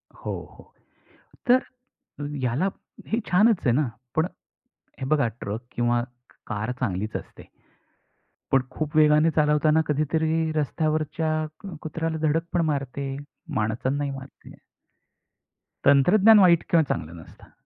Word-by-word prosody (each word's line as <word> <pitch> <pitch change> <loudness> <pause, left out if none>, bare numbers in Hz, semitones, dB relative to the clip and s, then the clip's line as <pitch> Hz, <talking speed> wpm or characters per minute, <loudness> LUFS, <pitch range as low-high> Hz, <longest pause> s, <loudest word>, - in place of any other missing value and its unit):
हो, - - -6 0.3
हो. - - -17 0.8
तर 255 +1 +6 0.7
ह्याला 130 +7 0 0.4
हे 225 - 0
छानच 210 +4 +5
आहे 120 - +4
ना. 145 -2 +2 0.3
पण 160 +2 +3 0.8
हे - - -2
बघा, 145 -6 +2
ट्रक 110 +1 -6
किंवा 120 0 +1 0.4
कार 110 +2 -3
चांगलीच 105 -2 -2
असते. - - -10 1.0
पण 135 -1 +5
खूप 155 0 -4
वेगाने 155 +1 +5
चालवताना 150 +1 +3
कधीतरी 160 +2 0
रस्त्यावरच्या 155 +1 0 0.5
कुत्र्याला 160 +1 -3
धडक 165 +3 +1
पण 175 - +2
मारते. 140 -2 -2 0.4
माणसांनाही 130 +6 -1
मारते. 135 0 -11 1.3
तंत्रज्ञान 190 +10 +6
वाईट 175 -3 +5
किंवा 165 -2 +4
चांगलं 85 - -4
नसतं. - - -17
150 Hz, 110 wpm, -25 LUFS, 130-160 Hz, 1.3 s, तर